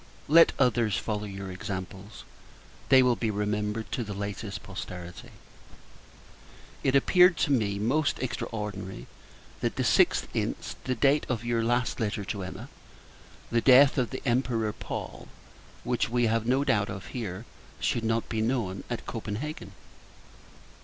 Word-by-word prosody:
Let 165 +3 +7
others 120 -6 +2
follow 105 -1 -3
your 95 -1 -6
examples; 95 0 -7 0.7
they 130 -1 +7
will 125 -1 +3
be 115 -1 -1
remembered 105 +1 -2
to 120 - -1
the 105 -2 -6
latest 100 +1 -5
posterity. 90 -3 -8 1.5
It 135 - +2
appeared 180 +5 +5
to - - +1
me 105 -6 +1
most 135 +9 +1
extraordinary, 105 - -5 0.5
that - - -1
the - - 0
6th - - +3
inst. - - -3
the 130 - 0
date 140 +5 +3
of 120 -2 -2
your 120 -1 +1
last 120 +1 0
letter 105 -2 -2
to 100 0 -4
Emma, 90 0 -7 0.8
the 115 0 +2
death 135 +2 +6
of 125 - 0
the 130 - -6
Emperor 120 -4 +1
Paul - - -7 0.6
(which 120 -3 0
we 120 0 +2
have 115 0 0
no 130 +3 +3
doubt 105 -7 +1
of 95 - -6
here) 105 -3 -5 0.3
should 115 - 0
not 115 0 0
be 110 -1 -2
known 110 -5 -1
at 120 - -4
Copenhagen! 115 +7 -5
115 Hz, 145 wpm, -28 LUFS, 100-125 Hz, 1.5 s, Let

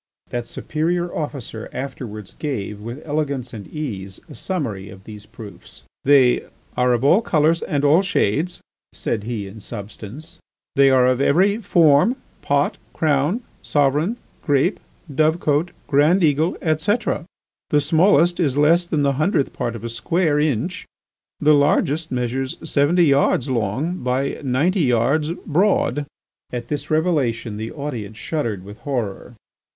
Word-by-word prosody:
That 120 -1 -3
superior 175 +3 -2
officer 135 -7 -5
afterwards 115 -6 -6
gave, 105 -8 -4
with 120 +7 -8
elegance 140 -5 -2
and 105 -3 -8
ease, 100 - -6
a 155 - -11
summary 120 - -4
of 95 0 -13
those 105 0 -11
proofs. 110 -4 -12 0.2
"They 135 -3 +4 0.3
are 125 0 +2
of 120 +1 0
all 175 +10 +5
colours 165 -5 +2
and 145 -4 -1
all 155 +6 +5
shades," 175 - 0 0.3
said 110 -3 -3
he 115 -4 -3
in 100 +3 -10
substance, 110 +7 -9 0.4
"they 140 0 +6
are 130 -1 +5
of 130 +1 +2
every 190 +9 +3
form—pot, 160 - +2
crown, 155 - +1 0.2
sovereign, 150 - +1 0.3
grape, 145 +6 +2 0.3
dove 155 +4 +2
cot, 150 +3 +1 0.2
grand 155 +7 +3
eagle, 155 +2 +2
etc. 170 +5 0 0.4
The 150 - +4
smallest 165 +3 +3
is 145 -6 +1
less 165 +4 +4
than 155 -4 0
the 140 0 +2
hundredth 155 -5 +1
part 120 -1 -3
of 115 - -8
a - - -3
square 150 +6 0
inch, 150 - -1 0.5
the 150 +1 +5
largest 150 +2 +2
measures 130 +1 -2
seventy 160 +3 +3
yards 140 -2 +2
long 130 - -1
by 130 +2 -1
ninety 145 +9 +1
yards 135 +4 +2 0.2
broad." 155 -4 +1 0.4
At 120 -1 -5
this 150 - -4
revelation 145 -10 0
the 110 +1 -5
audience 120 -8 -6
shuddered 115 - -3
with 105 +2 -11
horror. 120 -4 -4
145 Hz, 140 wpm, -21 LUFS, 120-160 Hz, 0.5 s, they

